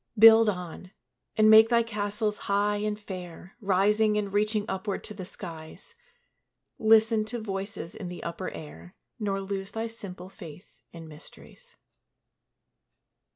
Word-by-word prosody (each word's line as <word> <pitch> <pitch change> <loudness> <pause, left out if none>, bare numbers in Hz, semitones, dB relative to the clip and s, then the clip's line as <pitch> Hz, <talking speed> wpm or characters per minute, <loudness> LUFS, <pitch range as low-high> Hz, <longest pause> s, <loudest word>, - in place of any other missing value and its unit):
Build 225 0 +8
on, 180 -1 -6 0.5
and 215 0 +5
make 220 +1 +8
thy 235 -1 +4
castles 210 -1 -2
high 205 +1 +2
and 210 0 -2
fair, 185 -2 -9
Rising 210 +2 +2
and 200 -2 -2
reaching 210 0 +1
upward 190 +1 -3
to 210 - -8
the 190 -3 -7
skies; 165 - -9 0.9
Listen 220 0 +4
to 220 +3 -4
voices 195 -4 -5
in 195 -5 -7
the 175 0 -8
upper 170 +2 -4
air, 85 - -11 0.2
Nor 200 -2 -1
lose 195 0 -4
thy 225 0 -2
simple 200 -6 -8
faith 180 -3 -13
in 165 -1 -10
mysteries. 165 - -14
205 Hz, 135 wpm, -27 LUFS, 185-215 Hz, 0.9 s, Build